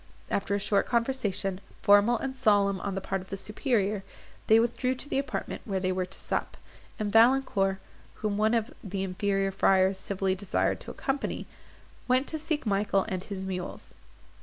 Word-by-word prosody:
After 200 Hz, 0 st, 0 dB
a -, -, 0 dB
short 200 Hz, 0 st, +1 dB
conversation, 210 Hz, -6 st, 0 dB, 0.2 s
formal 205 Hz, +4 st, +6 dB
and 265 Hz, +3 st, -4 dB
solemn 200 Hz, -5 st, +3 dB
on 200 Hz, -2 st, -3 dB
the 195 Hz, -, -2 dB
part 195 Hz, 0 st, -2 dB
of 185 Hz, -, -13 dB
the 195 Hz, -, -4 dB
superior, 210 Hz, -2 st, 0 dB, 0.4 s
they 220 Hz, +1 st, +7 dB
withdrew 250 Hz, +2 st, 0 dB
to 265 Hz, -, -7 dB
the 270 Hz, -, 0 dB
apartment 275 Hz, -1 st, -4 dB
where 195 Hz, -3 st, -2 dB
they 185 Hz, 0 st, 0 dB
were 185 Hz, 0 st, -1 dB
to 195 Hz, -, -5 dB
sup, -, -, -3 dB, 0.4 s
and 210 Hz, -1 st, -2 dB
Valancourt, 225 Hz, -5 st, +4 dB, 0.4 s
whom 210 Hz, -2 st, -2 dB
one 215 Hz, +3 st, +2 dB
of 230 Hz, 0 st, -1 dB
the 195 Hz, -2 st, -3 dB
inferior 195 Hz, +1 st, 0 dB
friars 190 Hz, 0 st, +3 dB
civilly 190 Hz, 0 st, -1 dB
desired 190 Hz, +1 st, 0 dB
to -, -, -10 dB
accompany, 270 Hz, +1 st, -3 dB, 0.6 s
went 255 Hz, +2 st, +3 dB
to 315 Hz, -, -3 dB
seek 310 Hz, -2 st, -2 dB
Michael 200 Hz, -1 st, +1 dB
and 185 Hz, -2 st, -3 dB
his 190 Hz, -2 st, -5 dB
mules. 180 Hz, -1 st, -5 dB
200 Hz, 175 wpm, -28 LUFS, 195-235 Hz, 0.6 s, they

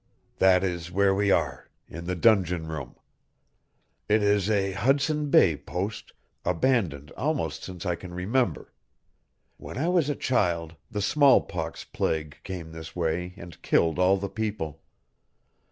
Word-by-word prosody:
That 95 Hz, -1 st, +5 dB
is 85 Hz, -2 st, -2 dB
where 100 Hz, +1 st, +3 dB
we 100 Hz, +1 st, +1 dB
are -, -, 0 dB, 0.2 s
in 85 Hz, +2 st, -8 dB
the 90 Hz, +1 st, -2 dB
dungeon 90 Hz, -5 st, +3 dB
room. 75 Hz, -5 st, -6 dB, 1.1 s
It 105 Hz, 0 st, +3 dB
is 100 Hz, -1 st, +2 dB
a 100 Hz, -2 st, +1 dB
Hudson 140 Hz, +8 st, +1 dB
Bay 85 Hz, -, +5 dB
post, 95 Hz, +8 st, -5 dB, 0.3 s
abandoned 90 Hz, -, 0 dB
almost 135 Hz, -, -2 dB
since 90 Hz, -1 st, -7 dB
I 90 Hz, -, +1 dB
can 85 Hz, +1 st, -8 dB
remember. 95 Hz, -, -1 dB, 0.8 s
When -, -, -9 dB
I 160 Hz, +6 st, 0 dB
was 175 Hz, -5 st, +2 dB
a 145 Hz, -, 0 dB
child 85 Hz, -, 0 dB
the 105 Hz, -1 st, -3 dB
smallpox 140 Hz, +5 st, +2 dB
plague 75 Hz, -2 st, -3 dB
came 90 Hz, -4 st, -6 dB
this 80 Hz, 0 st, -9 dB
way 90 Hz, +1 st, -2 dB
and 85 Hz, -2 st, -11 dB
killed 80 Hz, +1 st, +2 dB
all 95 Hz, +2 st, +4 dB
the 100 Hz, +1 st, -3 dB
people. 100 Hz, -6 st, -4 dB
95 Hz, 140 wpm, -27 LUFS, 85-110 Hz, 1.1 s, That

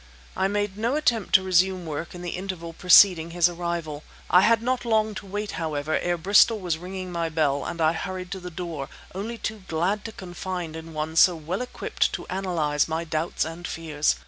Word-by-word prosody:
I 190 Hz, -, +1 dB
made 205 Hz, 0 st, -2 dB
no 235 Hz, +5 st, +1 dB
attempt 245 Hz, -9 st, +1 dB
to 190 Hz, -, +6 dB
resume 185 Hz, 0 st, +2 dB
work 160 Hz, +2 st, -5 dB
in 175 Hz, -, -8 dB
the 175 Hz, -, -3 dB
interval 180 Hz, -3 st, -5 dB
preceding 180 Hz, -1 st, +6 dB
his 175 Hz, 0 st, +3 dB
arrival. 170 Hz, -3 st, -4 dB, 0.3 s
I 180 Hz, -, +7 dB
had 230 Hz, +2 st, +4 dB
not 255 Hz, 0 st, 0 dB
long 220 Hz, -2 st, +1 dB
to 200 Hz, -, -8 dB
wait, 205 Hz, +2 st, -4 dB
however, 155 Hz, -1 st, -1 dB
ere 175 Hz, 0 st, -1 dB
Bristol 205 Hz, +5 st, +5 dB
was 175 Hz, -4 st, -2 dB
ringing 185 Hz, +1 st, -6 dB
my 170 Hz, -1 st, -1 dB
bell; 145 Hz, -3 st, +1 dB
and 170 Hz, -, -5 dB
I 160 Hz, 0 st, +3 dB
hurried 185 Hz, +2 st, -5 dB
to 195 Hz, -, -4 dB
the 180 Hz, 0 st, -7 dB
door, 165 Hz, -5 st, -5 dB, 0.2 s
only 215 Hz, +5 st, -5 dB
too 220 Hz, -3 st, -5 dB
glad 180 Hz, +6 st, 0 dB
to 225 Hz, -, -5 dB
confide 180 Hz, -3 st, -6 dB
in 160 Hz, 0 st, -8 dB
one 155 Hz, +1 st, -3 dB
so 180 Hz, +1 st, +7 dB
well 165 Hz, +7 st, -4 dB
equipped 250 Hz, -, -1 dB
to -, -, -4 dB
analyze 170 Hz, -6 st, 0 dB
my 160 Hz, +1 st, -2 dB
doubts 160 Hz, 0 st, -1 dB
and 165 Hz, +2 st, -6 dB
fears. 155 Hz, -, 0 dB
175 Hz, 200 wpm, -25 LUFS, 160-195 Hz, 0.3 s, I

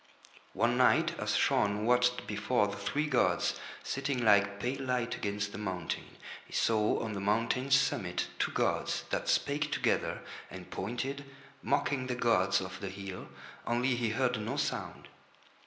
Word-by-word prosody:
One -, -, +2 dB
night -, -, +4 dB
as -, -, 0 dB
Shaun 105 Hz, +1 st, +2 dB
watched 125 Hz, 0 st, +3 dB
before 105 Hz, +2 st, +1 dB
the 100 Hz, 0 st, -4 dB
three 140 Hz, +9 st, -1 dB
gods 130 Hz, -5 st, +1 dB, 0.2 s
sitting 135 Hz, -3 st, -2 dB
like 100 Hz, -1 st, +4 dB
pale 125 Hz, +5 st, -2 dB
light 125 Hz, -2 st, -1 dB
against 100 Hz, -1 st, -2 dB
the 100 Hz, -, -7 dB
mountain, 95 Hz, -4 st, -4 dB, 0.3 s
he -, -, -16 dB
saw 110 Hz, -2 st, +2 dB
on 110 Hz, -2 st, -3 dB
the 100 Hz, -, -3 dB
mountain's 115 Hz, +7 st, +2 dB
summit 90 Hz, -8 st, -1 dB
two -, -, +1 dB
gods -, -, 0 dB
that -, -, -1 dB
spake 150 Hz, +1 st, +1 dB
together -, -, 0 dB, 0.3 s
and -, -, -10 dB
pointed, 135 Hz, +7 st, -3 dB, 0.4 s
mocking 140 Hz, -2 st, 0 dB
the 125 Hz, -, -1 dB
gods 115 Hz, -7 st, +2 dB
of 95 Hz, 0 st, -6 dB
the 100 Hz, -, -4 dB
hill, 95 Hz, -1 st, -7 dB, 0.4 s
only 120 Hz, +2 st, +2 dB
he 120 Hz, -2 st, 0 dB
heard 125 Hz, 0 st, 0 dB
no 105 Hz, -, -3 dB
sound. -, -, -3 dB
115 Hz, 155 wpm, -31 LUFS, 100-125 Hz, 0.4 s, night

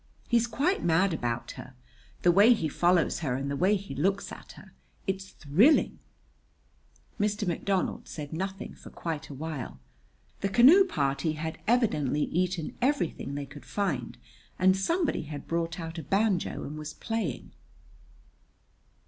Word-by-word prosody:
"He's 235 Hz, -1 st, +3 dB
quite 285 Hz, -, 0 dB
mad 170 Hz, +2 st, +3 dB
about 120 Hz, -6 st, -2 dB
her. 130 Hz, -, -10 dB, 0.5 s
The 175 Hz, -, +6 dB
way 205 Hz, +7 st, +7 dB
he 165 Hz, -9 st, -1 dB
follows 175 Hz, +3 st, +2 dB
her 135 Hz, -7 st, -1 dB
and 140 Hz, +2 st, -3 dB
the -, -, -1 dB
way 190 Hz, +7 st, +3 dB
he 195 Hz, -7 st, -5 dB
looks 195 Hz, +8 st, 0 dB
at -, -, -10 dB
her -, -, -15 dB, 0.3 s
it's 190 Hz, -1 st, -3 dB
thrilling!" 195 Hz, -, +3 dB, 1.2 s
Mr. 210 Hz, -1 st, 0 dB
McDonald 185 Hz, +2 st, -1 dB
said 150 Hz, -1 st, -7 dB
nothing 190 Hz, +3 st, -4 dB
for -, -, -13 dB
quite 160 Hz, -2 st, -5 dB
a 140 Hz, -, -7 dB
while. 150 Hz, -2 st, -5 dB, 0.6 s
The 195 Hz, -, -1 dB
canoe 275 Hz, -, +7 dB
party 145 Hz, -, 0 dB
had 160 Hz, +1 st, -5 dB
evidently 150 Hz, -, +2 dB
eaten 180 Hz, -2 st, -1 dB
everything 240 Hz, -, 0 dB
they 145 Hz, 0 st, -3 dB
could 140 Hz, +1 st, -12 dB
find, 155 Hz, -, -2 dB, 0.4 s
and 185 Hz, +1 st, +4 dB
somebody 325 Hz, -, 0 dB
had 145 Hz, -2 st, -7 dB
brought 165 Hz, +1 st, -2 dB
out 165 Hz, 0 st, -5 dB
a -, -, -6 dB
banjo 195 Hz, +2 st, 0 dB
and 150 Hz, +2 st, -6 dB
was 150 Hz, 0 st, -7 dB
playing. 225 Hz, -, -3 dB
175 Hz, 150 wpm, -28 LUFS, 150-205 Hz, 1.2 s, way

